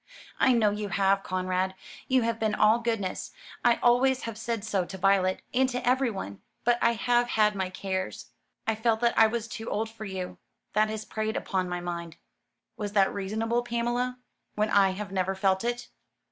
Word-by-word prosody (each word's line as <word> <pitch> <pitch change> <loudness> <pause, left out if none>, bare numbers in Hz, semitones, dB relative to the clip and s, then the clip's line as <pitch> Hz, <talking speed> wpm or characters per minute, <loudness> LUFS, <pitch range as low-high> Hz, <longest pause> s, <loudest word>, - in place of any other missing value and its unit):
"I 260 - +5
know 220 -3 +3
you 210 0 -3
have, 195 0 +2
Conrad. 185 0 -1 0.3
You 255 -2 +3
have 230 0 -1
been 215 -1 +1
all 215 +2 +4
goodness; 225 -5 -2 0.3
I 240 -1 +5
always 255 +2 +4
have 230 -2 -4
said 225 -1 -3
so 205 -4 0
to 190 +2 -8
Violet 190 0 +2
and 260 +1 +3
to 250 -1 -3
everyone. 230 - 0 0.2
But 240 0 +3
I 235 - +4
have 240 +1 +2
had 215 -3 +3
my 190 -2 -2
cares. 190 0 -4 0.3
I 225 - +2
felt 220 0 +1
that 235 -1 +2
I 225 - +7
was 230 0 -3
too 225 -1 -6
old 220 +1 -2
for 225 -1 -8
you. 190 -2 -5 0.3
That 215 +1 +3
has 220 0 -4
preyed 220 0 -2
upon 185 -2 -1
my 175 0 -3
mind." 170 -1 -5 0.6
"Was 205 -1 -4
that 195 -2 +3
reasonable, 220 +4 -1
Pamela, 240 +1 -1 0.4
when 210 0 0
I 195 -1 +5
have 190 +1 -5
never 190 0 0
felt 190 0 +1
it?" 240 0 -3
215 Hz, 190 wpm, -28 LUFS, 190-235 Hz, 0.6 s, I